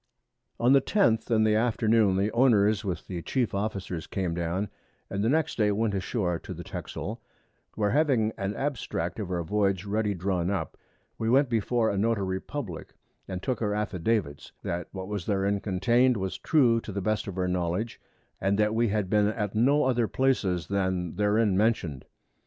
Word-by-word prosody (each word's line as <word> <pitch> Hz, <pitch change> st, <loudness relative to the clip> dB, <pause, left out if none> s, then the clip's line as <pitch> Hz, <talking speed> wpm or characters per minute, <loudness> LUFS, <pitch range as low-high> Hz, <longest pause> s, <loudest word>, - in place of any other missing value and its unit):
On 120 Hz, +3 st, +4 dB
the 140 Hz, -, +6 dB
10th 115 Hz, -, +2 dB
in 110 Hz, -2 st, +3 dB
the 110 Hz, -1 st, +3 dB
Afternoon, 110 Hz, -2 st, +3 dB
the 100 Hz, +3 st, +1 dB
Owners 110 Hz, -4 st, +3 dB
with 95 Hz, -4 st, -4 dB
the 90 Hz, -3 st, -5 dB
Chief 125 Hz, +5 st, -1 dB
Officers 100 Hz, -4 st, -3 dB
came 90 Hz, -3 st, -2 dB
down, 85 Hz, +4 st, -2 dB, 0.4 s
and 100 Hz, +1 st, -1 dB
the 110 Hz, -, +2 dB
next 155 Hz, -3 st, 0 dB
Day 105 Hz, -1 st, +3 dB
went 105 Hz, +1 st, 0 dB
a 100 Hz, -, 0 dB
shoar 90 Hz, -3 st, -1 dB
to -, -, -8 dB
the -, -, -7 dB
Texel, 115 Hz, +3 st, -6 dB, 0.5 s
where 105 Hz, -2 st, +1 dB
having 130 Hz, -7 st, +2 dB
an 100 Hz, 0 st, -3 dB
Abstract 125 Hz, -, -3 dB
of 100 Hz, -4 st, -4 dB
our 90 Hz, -2 st, -1 dB
Voyage 100 Hz, +1 st, 0 dB
ready 105 Hz, 0 st, 0 dB
drawn 90 Hz, -1 st, -1 dB
up, 100 Hz, -1 st, -2 dB, 0.4 s
we 110 Hz, -, 0 dB
went 135 Hz, +2 st, +4 dB
before 115 Hz, 0 st, +1 dB
a 100 Hz, -, -1 dB
Notary 100 Hz, -4 st, 0 dB
Publick, 115 Hz, -, -6 dB, 0.3 s
and 95 Hz, -1 st, -5 dB
took 130 Hz, -2 st, -2 dB
our 105 Hz, -2 st, 0 dB
Affidavits, 100 Hz, -6 st, -2 dB
that 85 Hz, 0 st, -3 dB
what 95 Hz, -1 st, -6 dB
was 105 Hz, -4 st, -4 dB
therein 100 Hz, 0 st, +1 dB
contain'd 120 Hz, +6 st, +2 dB
was 95 Hz, -1 st, -3 dB
true 120 Hz, -7 st, +3 dB
to 110 Hz, -, -7 dB
the 100 Hz, -, -3 dB
best 105 Hz, +3 st, -1 dB
of 95 Hz, -2 st, -6 dB
our 90 Hz, -1 st, 0 dB
Knowledge, 90 Hz, +5 st, -2 dB, 0.4 s
and 100 Hz, +1 st, +1 dB
that 105 Hz, 0 st, +2 dB
we 115 Hz, +1 st, +2 dB
had 105 Hz, -2 st, 0 dB
been 105 Hz, +2 st, +3 dB
at 105 Hz, -2 st, -2 dB
no 135 Hz, +7 st, +3 dB
other 125 Hz, -3 st, +2 dB
Places 100 Hz, -, +1 dB
than 95 Hz, -3 st, -1 dB
therein 105 Hz, 0 st, +2 dB
mention'd. 95 Hz, -, 0 dB
105 Hz, 185 wpm, -27 LUFS, 95-115 Hz, 0.5 s, the